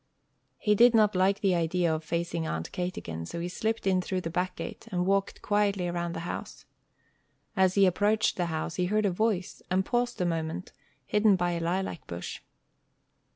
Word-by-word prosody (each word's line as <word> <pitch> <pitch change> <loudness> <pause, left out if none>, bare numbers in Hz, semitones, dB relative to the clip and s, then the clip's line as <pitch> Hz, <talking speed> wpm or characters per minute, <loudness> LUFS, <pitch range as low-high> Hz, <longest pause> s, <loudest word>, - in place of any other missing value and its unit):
He 210 - +2
did 235 +3 +6
not 215 -2 +4
like 190 +2 +2
the 195 -2 +3
idea 170 0 +1
of 155 0 -3
facing 170 0 -2
Aunt 80 0 -3
Kate 180 0 -3
again, 80 0 -5
so 170 - -5
he 170 - -2
slipped 220 +5 -2
in 185 -1 +3
through 185 0 -2
the 165 - -4
back 180 +2 -1
gate, - - -7
and 180 -1 0
walked 195 +1 0
quietly 205 -3 +1
around 175 -1 -2
the - - -4
house. 175 - -6 0.9
As 190 -2 +3
he 200 -1 +6
approached 205 +4 +2
the 175 -2 -1
house, 160 0 -3
he 180 - +1
heard 215 +2 +1
a 195 - +2
voice, 195 -1 -1
and 185 +1 +1
paused 240 0 0
a 180 - +1
moment, 165 0 -2 0.3
hidden 210 -1 +4
by 175 -1 0
a 170 - -1
lilac 175 +1 -2
bush. 85 +1 -6
180 Hz, 195 wpm, -28 LUFS, 170-200 Hz, 0.9 s, did